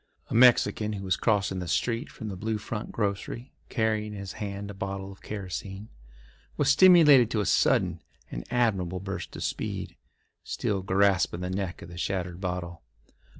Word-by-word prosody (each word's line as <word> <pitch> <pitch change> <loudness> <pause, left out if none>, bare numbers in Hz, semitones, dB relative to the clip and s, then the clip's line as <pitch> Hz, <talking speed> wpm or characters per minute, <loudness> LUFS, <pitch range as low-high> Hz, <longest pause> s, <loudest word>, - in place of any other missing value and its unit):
A - - -2
Mexican 115 -3 +4
who 100 -1 -5
was 95 - +2
crossing 100 -4 +1
the 90 - -5
street 115 - -1
from 110 - -8
the 95 - -5
Blue 110 +4 -2
Front 105 +1 -5
grocery 105 +4 -3 0.2
carrying 110 -2 0
in 100 - -7
his 100 -1 -6
hand 100 0 -4
a - - -8
bottle 95 0 -5
of 95 - -14
kerosene, 100 +1 -6 0.7
was - - +2
stimulated 150 - +7
to 110 - -1
a 105 - 0
sudden - - +2 0.3
and - - -5
admirable 95 -7 0
burst 95 +1 -6
of - - -5
speed, - - -4 0.5
still 100 -2 -2
grasping 95 -2 +2
the 90 0 -3
neck 95 -2 -4
of - - -10
the 85 0 -9
shattered 90 -2 -3
bottle. 90 -2 -4
100 Hz, 170 wpm, -27 LUFS, 95-110 Hz, 0.7 s, stimulated